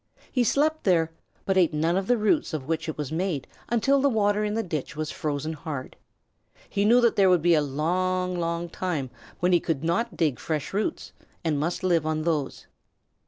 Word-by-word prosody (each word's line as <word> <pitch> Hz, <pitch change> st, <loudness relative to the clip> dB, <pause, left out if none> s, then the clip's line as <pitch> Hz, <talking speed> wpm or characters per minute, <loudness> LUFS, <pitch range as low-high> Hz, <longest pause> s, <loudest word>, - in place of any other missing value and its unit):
He 250 Hz, -, +2 dB
slept 310 Hz, +6 st, +1 dB
there, 165 Hz, -4 st, +2 dB, 0.3 s
but 190 Hz, -1 st, +1 dB
ate 170 Hz, -4 st, +3 dB
none 165 Hz, +3 st, +1 dB
of 190 Hz, 0 st, -1 dB
the 245 Hz, -, +3 dB
roots 215 Hz, -, +1 dB
of 140 Hz, -3 st, -5 dB
which 160 Hz, 0 st, -2 dB
it 155 Hz, -, -5 dB
was 150 Hz, -2 st, -4 dB
made 165 Hz, -4 st, -1 dB, 0.2 s
until 270 Hz, +4 st, +3 dB
the 280 Hz, -, +4 dB
water 210 Hz, -3 st, +2 dB
in 210 Hz, 0 st, -1 dB
the 225 Hz, -, 0 dB
ditch 155 Hz, -4 st, -4 dB
was 155 Hz, 0 st, -3 dB
frozen 150 Hz, +1 st, -3 dB
hard. 145 Hz, -4 st, -6 dB, 0.7 s
He 200 Hz, 0 st, 0 dB
knew 235 Hz, +3 st, +6 dB
that 235 Hz, -1 st, +3 dB
there 195 Hz, -2 st, +5 dB
would 180 Hz, -3 st, +3 dB
be 175 Hz, 0 st, +5 dB
a 155 Hz, -, +4 dB
long, 180 Hz, +6 st, 0 dB
long 170 Hz, 0 st, -2 dB
time 165 Hz, -7 st, -3 dB, 0.3 s
when 180 Hz, +1 st, +3 dB
he 175 Hz, -, +6 dB
could 160 Hz, -3 st, -2 dB
not 195 Hz, +8 st, -1 dB
dig 150 Hz, -7 st, +1 dB
fresh 155 Hz, 0 st, -3 dB
roots 215 Hz, -, -2 dB, 0.3 s
and 155 Hz, -4 st, 0 dB
must 170 Hz, +5 st, -2 dB
live 170 Hz, -4 st, +2 dB
on 155 Hz, 0 st, -1 dB
those. 155 Hz, -4 st, -2 dB
170 Hz, 205 wpm, -26 LUFS, 155-200 Hz, 0.7 s, knew